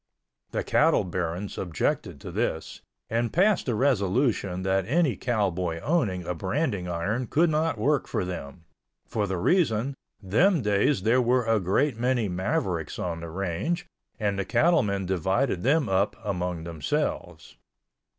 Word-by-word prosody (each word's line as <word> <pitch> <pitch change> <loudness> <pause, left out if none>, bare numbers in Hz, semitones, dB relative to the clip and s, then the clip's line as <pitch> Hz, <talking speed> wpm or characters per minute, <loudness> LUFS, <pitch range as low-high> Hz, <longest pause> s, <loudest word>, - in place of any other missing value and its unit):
The - - -2
cattle - - +3
barons 90 +2 -3
objected 85 -4 -2
to - - -7
this, 80 - -3 0.3
and 115 0 -1
passed 190 -3 +2
a 120 - +1
resolution 105 -5 +1
that 95 0 +1
any 150 - +2
cowboy 90 -7 -1
owning 115 - 0
a 90 - -2
branding 95 - -2
iron 100 +9 -2
could 160 +6 +3
not 155 -3 +1
work 140 +6 +1
for - - -1
them—for 90 +5 -6
the 95 -1 -2
reason, 130 - +2 0.3
them 135 - +2
days 105 +1 +2
there 120 +4 +4
were 125 0 +2
a 115 -1 +3
great 110 +7 +1
many 125 -2 +1
mavericks 90 -3 -2
on 85 -2 -3
the 85 0 -7
range 95 - -2 0.3
and 100 -2 0
the - - +1
cattlemen 115 - +2
divided 95 - 0
them 145 - +2
up 95 +2 +1
among 90 -4 -2
themselves. 80 -6 -3
100 Hz, 140 wpm, -26 LUFS, 90-130 Hz, 0.3 s, there